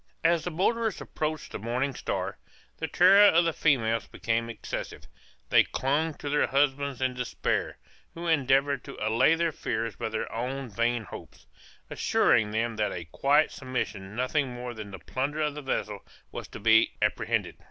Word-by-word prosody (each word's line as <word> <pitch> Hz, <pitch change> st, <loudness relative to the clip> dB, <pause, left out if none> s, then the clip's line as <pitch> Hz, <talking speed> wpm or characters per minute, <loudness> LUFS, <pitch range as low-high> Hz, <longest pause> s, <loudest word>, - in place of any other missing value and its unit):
As 165 Hz, 0 st, +3 dB
the -, -, -2 dB
boarders 220 Hz, +6 st, 0 dB
approached 155 Hz, -1 st, -4 dB
the -, -, -5 dB
Morning 125 Hz, +5 st, -1 dB
Star, -, -, -3 dB, 0.4 s
the 160 Hz, -, -3 dB
terror 185 Hz, +6 st, +6 dB
of 170 Hz, -2 st, +4 dB
the 165 Hz, -, +1 dB
females 115 Hz, -8 st, +1 dB
became 115 Hz, 0 st, -2 dB
excessive; 115 Hz, -, -6 dB, 0.5 s
they -, -, +7 dB
clung 150 Hz, +4 st, -1 dB
to -, -, -8 dB
their 150 Hz, +1 st, +2 dB
husbands 140 Hz, -1 st, 0 dB
in 130 Hz, -1 st, +1 dB
despair, 125 Hz, 0 st, -2 dB, 0.4 s
who 170 Hz, +1 st, -6 dB
endeavored 140 Hz, -3 st, +2 dB
to -, -, -9 dB
allay 115 Hz, +9 st, +3 dB
their 170 Hz, 0 st, 0 dB
fears 115 Hz, -6 st, -3 dB
by -, -, -3 dB
their 110 Hz, 0 st, -3 dB
own 130 Hz, +3 st, -3 dB
vain 115 Hz, +2 st, 0 dB
hopes, 90 Hz, -, -11 dB, 0.5 s
assuring 105 Hz, -1 st, +3 dB
them 115 Hz, +1 st, -1 dB
that 105 Hz, -1 st, 0 dB
a 85 Hz, -, -5 dB
quiet 145 Hz, +3 st, +3 dB
submission 110 Hz, -7 st, -4 dB
nothing 130 Hz, +4 st, 0 dB
more 125 Hz, 0 st, -6 dB
than 110 Hz, -3 st, -8 dB
the 95 Hz, -, -8 dB
plunder 140 Hz, +9 st, -3 dB
of 150 Hz, -1 st, 0 dB
the 150 Hz, -, -7 dB
vessel 105 Hz, -6 st, -2 dB, 0.3 s
was -, -, -6 dB
to -, -, -10 dB
be 110 Hz, +1 st, +4 dB
apprehended. -, -, 0 dB
130 Hz, 170 wpm, -28 LUFS, 115-150 Hz, 0.5 s, they